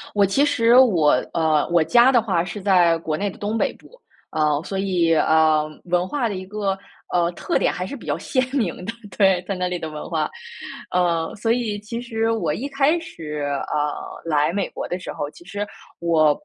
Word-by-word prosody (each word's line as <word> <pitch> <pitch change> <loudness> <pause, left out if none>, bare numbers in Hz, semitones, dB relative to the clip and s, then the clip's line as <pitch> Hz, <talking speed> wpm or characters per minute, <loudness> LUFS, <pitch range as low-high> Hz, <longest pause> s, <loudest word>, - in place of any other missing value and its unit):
我 200 - +5
其 270 +9 +3
实 245 -4 +4
我 180 - +5 0.2
呃， 160 -3 +2
我 170 -2 +4
家 240 +10 +5
的 240 -3 +4
话 180 -6 0
是 200 +1 -7
在 175 -4 +4
国 155 -2 -2
内 205 +3 -1
的 - - -9
东 215 +2 -2
北 - - +1
部， - - -19 0.3
啊， 150 -1 +1
所 195 +2 -4
以， 180 -4 +1
呃， 155 -1 +3 0.2
文 180 +1 +1
化 265 -6 -1
的 200 - -4
一 185 0 -7
个， 195 -1 -2 0.3
呃， 170 -1 +2
特 - - -1
点 - - +1
还 180 - -4
是 280 - -6
比 - - -12
较 - - 0
鲜 255 - -1
明 225 - 0
的， 230 - -2 0.3
对， 190 -3 +4
在 195 - -1
那 180 0 -1
里 180 0 -2
的 160 -2 -5
文 150 - -7
化。 - - -1 0.6
呃， 170 -2 +1
所 225 +2 -2
以 220 -4 -1
其 230 +3 -5
实 225 -2 -1
我 170 -10 0
一 275 - -4
开 280 +4 +2
始， 155 - -7
呃， 145 +1 -1 0.3
来 150 0 +1
美 200 0 -1
国 - - -5
的 180 +1 -4
时 - - -6
候， 145 - -4
其 175 - -16
实 205 +1 -4 0.3
我， 165 -3 +3
185 Hz, 225 characters per minute, -22 LUFS, 165-225 Hz, 0.6 s, 我